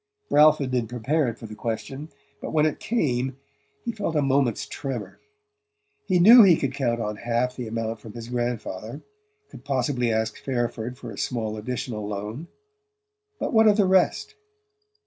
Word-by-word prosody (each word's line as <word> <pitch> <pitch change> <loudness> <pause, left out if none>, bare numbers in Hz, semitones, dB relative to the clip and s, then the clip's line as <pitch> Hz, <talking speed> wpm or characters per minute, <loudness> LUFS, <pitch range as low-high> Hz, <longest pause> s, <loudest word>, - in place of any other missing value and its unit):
Ralph 150 +1 +6
had 135 -3 -3
been 125 -3 0
prepared 125 +2 -1
for - - -10
the 110 - -9
question, 120 +7 -5 0.3
but - - -5
when 155 -1 +3
it 155 - -1
came 130 - -1 0.5
he 235 - -1
felt 205 -7 -3
a 150 - +3
moment's 135 -3 +1
tremor. 130 -6 -6 0.9
He 185 - +3
knew 225 +8 +9
he 185 -6 +7
could 135 -2 -2
count 120 -4 -1
on 105 -2 -3
half 120 +2 -1
the 125 -3 -5
amount 115 0 -3
from 105 0 -11
his 115 0 -8
grandfather; 120 0 -4 0.5
could - - -12
possibly 130 -3 0
ask 110 -1 -1
Fairford 120 -1 -2
for 120 -2 -8
a 100 - -8
small 110 -3 -2
additional 110 -1 -4
loan 105 +9 -5 0.9
but - - -2
what 220 -1 +6
of 210 0 +5
the 205 - +4
rest? 190 - +2
125 Hz, 165 wpm, -25 LUFS, 115-150 Hz, 0.9 s, knew